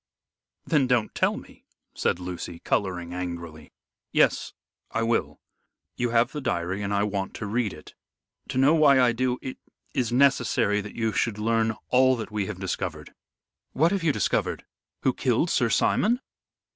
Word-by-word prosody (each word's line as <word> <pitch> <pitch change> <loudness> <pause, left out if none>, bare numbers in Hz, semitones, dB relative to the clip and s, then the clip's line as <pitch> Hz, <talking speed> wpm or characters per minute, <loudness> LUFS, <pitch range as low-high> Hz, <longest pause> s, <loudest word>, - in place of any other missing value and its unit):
"Then 145 -5 +2
don't 120 -4 +1
tell - - +1
me," - - -13 0.3
said - - 0
Lucy, 90 -1 -6
coloring 90 -1 -2
angrily. 85 -3 -6 0.4
"Yes, - - +2 0.4
I 115 - -1
will. 115 -11 0 0.6
You 120 0 -1
have 115 +1 +2
the 150 - -5
diary 95 -5 -2
and 100 0 -3
I 100 0 +2
want 100 -2 -3
to 105 - -5
read 110 0 0
it. - - -12 0.5
To - - -4
know 135 +4 +5
why 145 -4 +6
I 125 -2 +5
do, 125 +1 0
it 130 - -5 0.4
is 120 -3 0
necessary 125 -5 +3
that 105 +1 -9
you 110 -1 0
should 110 -3 0
learn 110 0 +1
all 130 +1 +5
that 110 -2 -6
we 105 -2 -2
have 105 -3 -6
discovered." 95 -1 -4 0.6
"What 165 +5 +3
have 200 -1 0
you 165 -2 +3
discovered? - - -1 0.4
Who - - +2
killed - - +1
Sir - - +2
Simon?" 240 +4 +2
115 Hz, 165 wpm, -26 LUFS, 95-130 Hz, 0.6 s, why